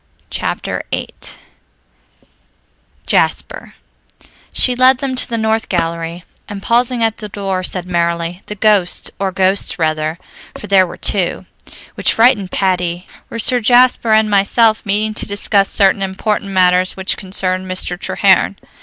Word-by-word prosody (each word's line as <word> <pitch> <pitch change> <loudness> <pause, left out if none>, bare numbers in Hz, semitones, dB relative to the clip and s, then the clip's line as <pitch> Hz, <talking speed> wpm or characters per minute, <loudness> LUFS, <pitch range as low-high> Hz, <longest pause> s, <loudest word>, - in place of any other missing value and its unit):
Chapter - - -3
VIII - - -3 2.0
JASPER - - -1 0.8
She 250 - +2
led 255 +1 +4
them 265 0 -3
to 255 - +3
the 230 - -1
north 220 0 -1
gallery 165 -1 -3 0.3
and, 200 -1 -7
pausing 240 0 +1
at 225 -1 0
the 210 -2 -7
door, 195 -2 -3
said 180 -1 -2
merrily, 170 0 -2
"The 210 - -6
ghost 205 -4 +1
or 195 -1 -1
ghosts 190 +1 0
rather, 155 -1 -1 0.4
for - - -9
there 190 -2 +3
were - - -10
two 185 -4 -1 0.5
which - - +3
frightened 225 -5 +3
Patty 180 -2 -1 0.2
were - - -6
Sir 245 +2 +2
Jasper 245 0 +3
and 220 0 +4
myself, 215 +2 +2
meeting 215 +2 0
to - - -1
discuss 200 0 +1
certain 195 0 +2
important 195 +1 -2
matters 185 -1 +2
which 190 0 -1
concerned 185 -1 -3
Mr. 185 -1 -2
Treherne. - - +2
195 Hz, 140 wpm, -15 LUFS, 180-220 Hz, 2.0 s, led